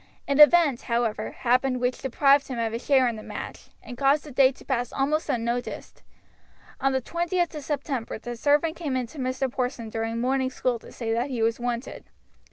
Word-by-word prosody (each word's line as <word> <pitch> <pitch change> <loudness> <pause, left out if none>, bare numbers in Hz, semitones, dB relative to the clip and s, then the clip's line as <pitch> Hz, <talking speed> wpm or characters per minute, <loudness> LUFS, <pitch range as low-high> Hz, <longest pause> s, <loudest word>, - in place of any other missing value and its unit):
An 280 +1 +1
event, 300 -4 +6
however, 230 -2 0
happened 255 +1 +1
which 250 0 -1
deprived 275 +2 +3
him 255 - -5
of 225 -1 -1
his 230 - -4
share 265 -3 +4
in 235 -2 -2
the - - -8
match, - - -8
and 245 -1 -9
caused 280 +2 +3
the 300 - -10
day 265 0 +5
to 270 - -17
pass 245 0 -1
almost 295 +3 0
unnoticed. 240 +1 -3 0.8
On 270 - +2
the 265 -1 -1
20th 345 +2 -1
of 300 -2 -6
September 270 -6 -3
the 240 +2 -6
servant 295 +6 +2
came 300 -7 -3
in 255 -1 0
to 275 +6 -12
Mr. 260 +1 -1
Porson 245 -3 -3
during 225 +1 -2
morning 260 +2 +1
school 250 -2 -1
to - - -14
say 225 -2 -3
that 240 +4 -1
he 240 -4 -1
was 225 +1 +1
wanted. 240 +1 -4
255 Hz, 200 wpm, -26 LUFS, 235-280 Hz, 0.8 s, event